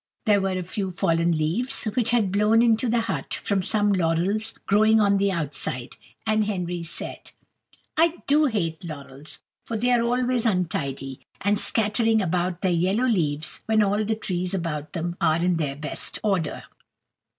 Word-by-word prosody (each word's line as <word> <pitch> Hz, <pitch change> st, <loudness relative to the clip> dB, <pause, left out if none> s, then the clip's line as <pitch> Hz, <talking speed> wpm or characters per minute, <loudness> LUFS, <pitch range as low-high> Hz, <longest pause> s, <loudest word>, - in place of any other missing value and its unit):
There 205 Hz, -3 st, +4 dB
were 190 Hz, -1 st, -1 dB
a 185 Hz, -, -3 dB
few 190 Hz, +2 st, -4 dB
fallen 170 Hz, -2 st, +1 dB
leaves 170 Hz, +12 st, 0 dB
which 230 Hz, +1 st, +1 dB
had 225 Hz, -6 st, +2 dB
blown 210 Hz, +3 st, +3 dB
into 230 Hz, +1 st, +2 dB
the 235 Hz, 0 st, +2 dB
hut 225 Hz, -, -3 dB
from 200 Hz, -2 st, -1 dB
some 205 Hz, +1 st, +2 dB
laurels 185 Hz, +6 st, +1 dB
growing 215 Hz, +2 st, +4 dB
on 200 Hz, -1 st, +3 dB
the 200 Hz, 0 st, +1 dB
outside; 145 Hz, -7 st, -2 dB, 0.3 s
and 215 Hz, -1 st, +2 dB
Henry 180 Hz, -4 st, -3 dB
said: 165 Hz, 0 st, -5 dB, 0.7 s
"I 330 Hz, +2 st, +3 dB
do 300 Hz, +2 st, +4 dB
hate 185 Hz, -, -2 dB
laurels; 145 Hz, -3 st, -7 dB, 0.3 s
for 230 Hz, -, -4 dB
they 245 Hz, +3 st, +1 dB
are 240 Hz, -1 st, +3 dB
always 245 Hz, 0 st, +1 dB
untidy, 140 Hz, -, -2 dB, 0.2 s
and 205 Hz, +1 st, +1 dB
scattering 225 Hz, +1 st, +3 dB
about 180 Hz, -1 st, -1 dB
their 185 Hz, -, +1 dB
yellow 185 Hz, +8 st, +1 dB
leaves 155 Hz, -, 0 dB
when 220 Hz, -1 st, +3 dB
all 205 Hz, +1 st, +1 dB
the 220 Hz, +1 st, -1 dB
trees 185 Hz, -3 st, -2 dB
about 155 Hz, -4 st, -4 dB
them 175 Hz, 0 st, -3 dB
are 160 Hz, -2 st, +3 dB
in 175 Hz, 0 st, +1 dB
their 145 Hz, -4 st, -2 dB
best 150 Hz, +1 st, -2 dB
order." 190 Hz, -7 st, -1 dB
195 Hz, 165 wpm, -24 LUFS, 170-220 Hz, 0.7 s, There